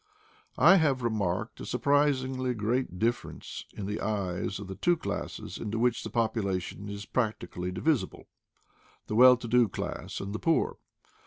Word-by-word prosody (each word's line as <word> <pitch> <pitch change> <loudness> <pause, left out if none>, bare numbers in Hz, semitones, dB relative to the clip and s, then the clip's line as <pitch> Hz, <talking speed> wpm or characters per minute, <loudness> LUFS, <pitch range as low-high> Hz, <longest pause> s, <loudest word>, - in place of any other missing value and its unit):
I 195 - +7
have 140 -7 +2
remarked 100 -6 -1
a - - -6
surprisingly 130 -3 +1
great 110 -2 -1
difference 115 +4 -3
in 100 - -5
the 105 +2 -3
eyes 100 -2 -2
of 100 - -7
the 95 - -5
two 175 - +2
classes - - -5
into 110 +1 -3
which 120 0 +1
the - - -5
population 100 -4 -1
is 100 0 -6
practically 90 -7 -2
divisible 140 - -1 0.4
— - - -33
the - - -5
well 125 +3 +8
to 120 - -7
do 120 0 +4
class 95 - -5
and 100 +1 -5
the 110 - -3
poor. 165 -1 +1
110 Hz, 160 wpm, -29 LUFS, 100-130 Hz, 0.4 s, well